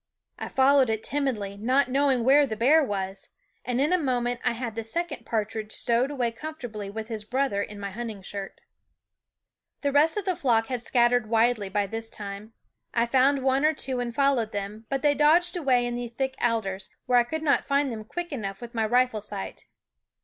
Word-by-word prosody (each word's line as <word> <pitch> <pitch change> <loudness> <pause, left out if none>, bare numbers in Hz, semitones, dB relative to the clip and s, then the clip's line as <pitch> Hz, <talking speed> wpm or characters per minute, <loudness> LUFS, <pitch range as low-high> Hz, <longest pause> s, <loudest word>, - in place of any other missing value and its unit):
I - - -4
followed 270 -1 +4
it 220 -1 -1
timidly, 235 -9 -2
not 255 +5 +2
knowing 265 -2 +2
where 280 +3 +5
the 220 - -3
bear 290 +8 +4
was, 195 -5 -4 0.3
and 250 0 -1
in 295 +6 +2
a 365 - +3
moment 245 -4 -1
I 250 - +2
had 235 -1 -4
the 225 +1 -4
second 340 +10 -3
partridge 215 -1 -2
stowed 240 +4 +1
away 250 -5 -1
comfortably 235 -7 -7
with 220 +2 -6
his 220 -3 -4
brother 250 -2 0
in 205 0 -6
my 200 -1 -5
hunting 220 -2 -6
shirt. 195 0 -7 1.2
The 285 - 0
rest 300 +6 +3
of 415 - -2
the 370 -2 0
flock 230 -6 +2
had 250 -2 -2
scattered 240 -1 +2
widely 225 -3 +2
by 205 +1 0
this 225 +3 -5
time. 205 +1 -8 0.4
I 235 0 +3
found 265 +2 +3
one 265 +1 +2
or 310 +1 +3
two 260 -3 -2
and 240 -1 -2
fol 275 +3 +3
lowed 225 -2 -2
them; 205 +2 -5
but 275 0 -2
they 295 -1 +4
dodged 335 +5 +4
away 260 -7 +2
into 240 0 -3
the 240 - -4
thick 265 +3 -3
alders, 215 -5 -1 0.2
where 250 -1 +4
I - - +4
could 315 +6 -4
not 290 -3 +2
find 280 -1 +1
them 220 -2 -6
quick 345 +10 -6
enough 195 -8 -4
with 240 0 -9
my 225 -2 0
rifle 245 -2 +2
sight. 200 -1 -5
240 Hz, 205 wpm, -26 LUFS, 220-275 Hz, 1.2 s, where